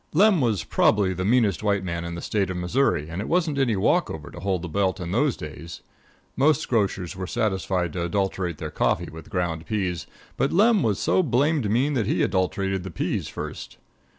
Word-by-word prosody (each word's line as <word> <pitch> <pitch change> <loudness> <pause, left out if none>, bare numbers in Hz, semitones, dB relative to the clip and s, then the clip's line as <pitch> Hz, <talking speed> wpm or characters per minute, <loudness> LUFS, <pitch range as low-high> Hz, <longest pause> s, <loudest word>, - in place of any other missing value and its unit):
Lem 190 0 +5
was 110 -9 +1
probably 95 +4 +2
the 95 +1 -3
meanest 110 -2 +2
white 100 -2 +1
man 85 -2 -3
in 85 0 -5
the 85 - -7
State 100 -3 0
of 95 - -3
Missouri, 90 - +1
and 85 +4 -4
it 105 - -5
wasn't 165 -5 +1
any 125 -5 +2
walk 95 - +2
over 75 -1 -7
to - - -9
hold 95 -1 -1
the - - -3
belt 95 +3 0
in 90 -1 -4
those 125 +6 +1
days. 80 +2 -8 0.5
Most 145 +2 +2
grocers 100 -5 0
were 95 -1 -5
satisfied 95 -4 -1
to 85 - -2
adulterate 95 -2 -1
their - - -5
coffee - - 0
with 80 +1 -11
ground 85 -3 -2
peas, 95 -6 -2 0.3
but 135 - +1
Lem 210 +3 +4
was 105 -4 +1
so - - +2
blamed 140 - +1
mean 130 +7 +2
that 115 -7 0
he - - +1
adulterated 95 0 0
the 95 - -6
peas 85 - -2
first. - - -7
95 Hz, 205 wpm, -24 LUFS, 90-120 Hz, 0.5 s, Lem